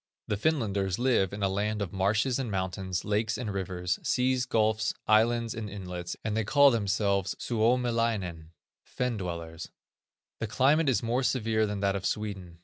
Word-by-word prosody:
The 105 - 0
Finlanders 100 - 0
live 120 -7 +2
in 100 0 -4
a - - +4
land 105 +2 -1
of 100 -4 -3
marshes 105 +7 +1
and 130 -4 -2
mountains, 95 -1 -3
lakes 105 +1 0
and 110 -4 -4
rivers, 90 -2 -2
seas, 130 0 +1
gulfs, 110 -2 +1
islands, 115 +1 +3
and 110 -2 -5
inlets, 90 -3 -6
and 110 -1 -2
they 110 - +1
call 140 +5 +6
themselves 100 -3 0
Suomilainen, 115 -8 0 0.3
Fen 125 -2 -2
dwellers. 85 -3 -6 0.7
The 110 - -2
climate 140 +7 +3
is 125 - +1
more 120 +3 +1
severe 110 -4 +1
than 105 -1 -4
that 100 -1 +1
of 95 -1 -1
Sweden. 95 -5 -4
105 Hz, 160 wpm, -29 LUFS, 95-115 Hz, 0.7 s, call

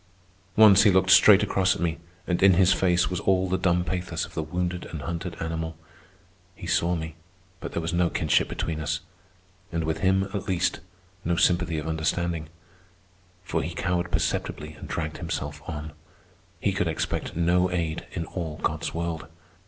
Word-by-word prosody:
Once 105 -2 +8
he 105 - +6
looked 95 0 +3
straight 105 0 +8
across 95 -2 +2
at - - -7
me, 85 -1 -1 0.3
and 90 -1 -1
in 95 -1 +7
his 95 0 +5
face 90 -1 +2
was 90 - -1
all 95 -1 +2
the 95 - 0
dumb 90 -1 +2
pathos 90 0 -3
of - - -15
the - - -2
wounded 90 +2 -3
and 80 -3 -7
hunted 85 +1 -5
animal. 80 0 -4 0.8
He - - -9
saw 85 +1 +1
me, 80 -1 -5 0.5
but - - -7
there 85 - -2
was 80 +1 -2
no 85 0 +2
kinship 75 -2 +1
between 80 -1 -3
us, 75 -1 -2 0.7
and 85 -1 -1
with 80 0 -2
him, 95 +2 +3
at 100 - -4
least, 95 0 0 0.4
no 85 +1 +1
sympathy 85 -2 +2
of 75 +1 -4
understanding; 80 0 -1 0.9
for 80 -3 -1
he 85 +1 -5
cowered 90 0 -1
perceptibly 75 0 -2
and - - -10
dragged 80 -1 -3
himself 75 +1 -4
on. 75 -1 -5 0.7
He - - 0
could - - 0
expect - - -2
no 90 +2 +2
aid 85 -3 -2
in 85 -3 -3
all 80 -3 -5
God's - - -1
world. 85 -2 -3
85 Hz, 175 wpm, -26 LUFS, 80-90 Hz, 0.9 s, Once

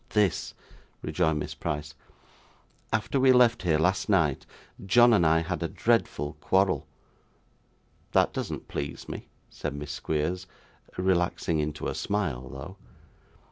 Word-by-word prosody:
'This,' 105 -5 +1 0.5
rejoined 80 -4 +1
Miss 75 - -4
Price. 75 +1 -4 1.0
'After 115 +4 0
we 130 0 +6
left 125 -2 +5
here 85 -4 +2
last 95 +5 +1
night 80 -9 +2 0.4
John 120 +5 +6
and 100 - +4
I 80 +1 +4
had 85 +1 -3
a 85 - 0
dreadful 80 -9 0
quarrel.' 95 +2 +2 1.2
'That - - +3
doesn't - - -4
please 70 -1 -5
me,' - - -7 0.2
said - - -5
Miss 70 0 -6
Squeers 80 +5 -2 0.5
relaxing 90 -3 +1
into 75 0 -3
a - - -2
smile 80 -12 -2
though. 70 +10 -9
90 Hz, 130 wpm, -27 LUFS, 75-100 Hz, 1.2 s, we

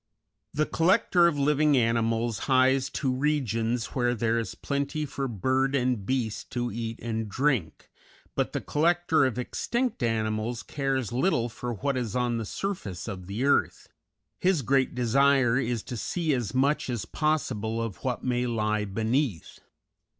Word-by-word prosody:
The 155 +1 +1
collector 175 +1 +3
of 160 -4 0
living 145 0 +3
animals 115 -1 +1
hies 130 0 +4
to 130 -3 -1
regions 125 -4 0
where 120 -2 +1
there 115 0 +1
is 115 - -4
plenty 140 +2 -2
for 140 -1 -3
bird 130 +5 0
and 125 -6 0
beast 120 -5 -2
to 120 -1 -1
eat 115 +1 -4
and 110 -2 -3
drink, 125 - -1 0.5
but - - -1
the - - -3
collector 165 -1 +2
of 125 - -4
extinct 235 - -2
animals 110 0 -1
cares 135 -5 -2
little 120 -2 +1
for 120 +1 -5
what 135 +6 -1
is 120 -4 -3
on 120 -2 0
the 115 - -3
surface 110 - -4
of 95 -4 -6
the 105 +7 -2
earth; 140 - +1 0.5
his 180 -6 +2
great 135 +2 +2
desire 130 0 +3
is 120 -3 -1
to 125 - -6
see 160 - -1
as 120 -6 -1
much 135 +2 +1
as 115 -4 -2
possible 115 -9 -1
of 115 -5 -3
what 125 -2 -2
may 125 -1 0
lie 105 -2 0
beneath. 110 - -1
125 Hz, 155 wpm, -27 LUFS, 115-140 Hz, 0.5 s, hies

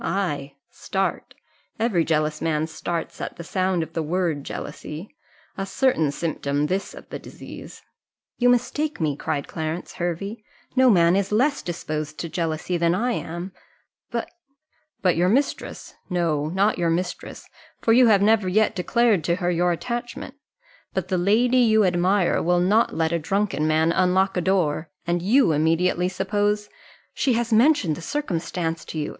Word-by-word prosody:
Ay, 145 -8 -2 0.2
start 195 0 -3 0.4
every 215 -7 +2
jealous 155 -1 0
man 155 -1 0
starts 165 +1 -5
at - - -5
the 170 - -7
sound 185 -1 0
of 160 +1 -10
the 165 - -1
word 160 -2 -1
jealousy 165 - -7 0.4
a - - -1
certain 195 - +1
symptom 145 -2 -1
this 190 +5 -2
of - - -12
the - - -6
disease." - - -11 0.6
"You 245 0 +4
mistake 290 +5 0
me," 155 -4 0
cried 140 0 -3
Clarence 160 +2 -4
Hervey; 195 +6 -4 0.3
"no 260 -1 +5
man 175 -4 +5
is 200 0 0
less 265 +7 +2
disposed 155 -3 -4
to 170 - -4
jealousy 165 +1 -2
than 170 +1 +2
I 240 +6 0
am 175 -3 -4 0.6
but - - -3 0.3
" 310 0 -45
"But 180 -3 +3
your 180 +2 +3
mistress 270 +8 -1 0.2
no, 165 -5 0
not 195 +5 +1
your 170 -1 +2
mistress, 180 +2 -3 0.3
for 225 - +3
you 250 +1 +6
have 200 -3 +5
never 215 -2 +3
yet 215 +3 +2
declared 215 -1 +2
to 170 - +2
her 180 -1 -1
your 175 +1 +2
attachment 240 - -4 0.6
but 190 -1 -2
the 185 - +1
lady 230 +7 +3
you 220 -4 +5
admire 180 +1 +2
will 175 +1 +2
not 205 +6 +2
let 160 0 +1
a 170 - +1
drunken 165 -3 0
man 160 +1 +3
unlock 190 +2 +2
a 180 - +1
door, 165 -4 0 0.2
and 175 0 0
you 220 +2 +4
immediately 165 +4 +2
suppose 205 +2 -1 0.2
" - - -29
"She 260 - +1
has 235 0 0
mentioned 225 - +4
the 170 - -9
circumstance 170 - -3
to - - -7
you!" 150 - -2
180 Hz, 165 wpm, -24 LUFS, 165-210 Hz, 0.6 s, you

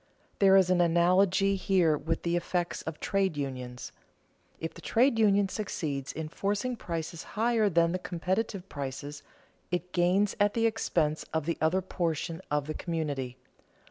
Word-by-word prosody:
There 195 -1 +6
is 185 -1 +4
an 180 -1 +4
analogy 185 +3 +3
here 185 -5 +3
with 155 +3 -3
the 170 0 0
effects 175 0 -1
of 160 -1 -6
trade 195 -5 0
unions. 125 -3 -5 0.7
If 165 - -4
the - - -12
trade 235 0 +2
union 205 -2 +4
succeeds 150 -9 -3
in 160 -1 -5
forcing 205 +9 -2
prices 165 -5 -5 0.2
higher 225 -1 +3
than 170 -1 +3
the 185 - -2
competitive 185 +2 -2
prices, 145 0 -6 0.5
it 180 0 -3
gains 185 +3 +2
at 205 0 +3
the 230 0 +2
expense 165 -9 0
of 160 -2 0
the 170 - -2
other 175 +4 +2
portion 165 -1 -2
of 145 -1 0
the 155 - -4
community. 145 -7 -3
175 Hz, 155 wpm, -29 LUFS, 155-195 Hz, 0.7 s, There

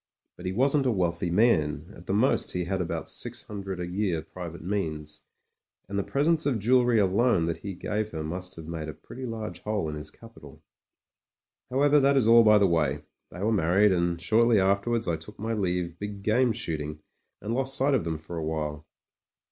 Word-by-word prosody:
But 90 - -7
he - - -1
wasn't 135 +6 +2
a - - +3
wealthy 85 -3 0
man 80 -7 +2
— - - -18
^at 85 - -14
the - - -1
most 125 +6 +2
he 90 - -1
had 95 +2 -2
about 85 - -3
six - - -3
hundred 95 -3 -6
a 90 - -2
year 90 -3 -1
private 85 -1 -8
means 80 -6 -4 0.3
— - - -54
^and 100 - -6
the 100 - 0
presents 155 - +1
of 130 -5 +1
jewellery 120 +2 +3
alone 100 0 +3
that 85 0 -2
he 100 -2 -6
gave 105 +4 -2
her 80 -4 -5
must 90 +4 -5
have 80 -1 -9
made 80 -2 -5
a - - -5
pretty 130 +1 -9
large 110 -2 -5
hole 105 -6 -2
in - - -5
his 75 0 -7
capital. - - -15 1.1
However 145 +3 +4
that 140 0 +4
is 120 -5 +4
all 115 +1 +8
by 105 -1 +6
the 100 - +4
way. 75 -5 +1 0.3
They 90 - -9
were 110 +3 +1
mar 90 -4 +1
ried, 105 0 +6
and 85 -1 0
shortly 110 +5 +3
afterwards 100 +4 +1
I 85 -1 0
took 80 - -13
my 115 +2 -3
leave 90 -4 -2
big 105 -1 -6
game 120 +4 +3
shooting 75 -6 -4 0.4
and 105 +3 -4
lost 135 +2 +1
sight 140 +2 +3
of 130 - +2
them 80 -1 -2
for 85 +2 -8
a 80 - -3
while. 75 -1 -4
95 Hz, 210 wpm, -27 LUFS, 85-115 Hz, 1.1 s, all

